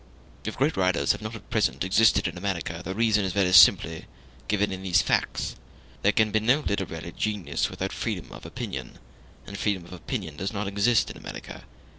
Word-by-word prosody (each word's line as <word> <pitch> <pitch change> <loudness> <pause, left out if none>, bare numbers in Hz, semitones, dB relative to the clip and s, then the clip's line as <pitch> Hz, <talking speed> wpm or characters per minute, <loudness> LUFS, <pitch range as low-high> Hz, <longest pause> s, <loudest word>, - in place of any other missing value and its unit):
If 110 - -4
great 145 +4 +1
writers 95 -2 +2
have - - -3
not 110 +1 -6
at 115 - -13
present 70 +5 +1
existed 100 +2 +4
in 85 - -5
America, 90 -3 -3
the 95 - -5
reason 110 -2 +2
is 95 -2 -2
very 95 -2 +2
simply 80 -2 +6 0.4
given 105 -1 +1
in 95 0 -5
these 90 -2 +2
facts; - - -1 0.5
there - - +4
can 110 -1 +2
be 110 - +3
no 125 +7 +3
literary 85 - -3
genius 105 -4 -1
without - - -4
freedom - - -4
of - - -11
opinion, - - -6 0.5
and 100 - -8
freedom 95 -5 -1
of 90 - -12
opinion 90 - -5
does 95 +4 -3
not 105 -1 -3
exist 105 +4 +2
in - - -10
America. - - -9
100 Hz, 190 wpm, -26 LUFS, 90-110 Hz, 0.5 s, simply